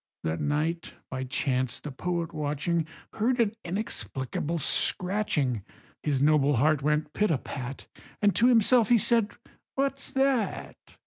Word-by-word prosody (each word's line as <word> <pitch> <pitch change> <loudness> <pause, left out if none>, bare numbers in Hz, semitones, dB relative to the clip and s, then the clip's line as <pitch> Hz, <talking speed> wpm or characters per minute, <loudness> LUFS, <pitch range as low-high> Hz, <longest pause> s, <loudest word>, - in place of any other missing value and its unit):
That 80 +1 -2
night, 155 +3 -1 0.2
by 130 0 -3
chance, 130 -2 -1
the 150 - -7
poet 170 +3 -3
watching, 155 +2 -1 0.3
Heard 240 +4 +1
an 225 -2 +3
inexplicable 170 - -3
scratching; 160 - 0 0.4
His 140 -3 0
noble 145 -1 +4
heart 150 +4 +3
went 150 +1 0
pit 210 0 +1
a 155 - +2
pat, 130 +1 -7 0.3
And 205 -1 +3
to 235 - +5
himself 235 -1 +5
he 240 - +6
said 225 0 +2 0.5
"What's 275 0 -1
that?" 265 -5 0
160 Hz, 135 wpm, -28 LUFS, 140-210 Hz, 0.5 s, he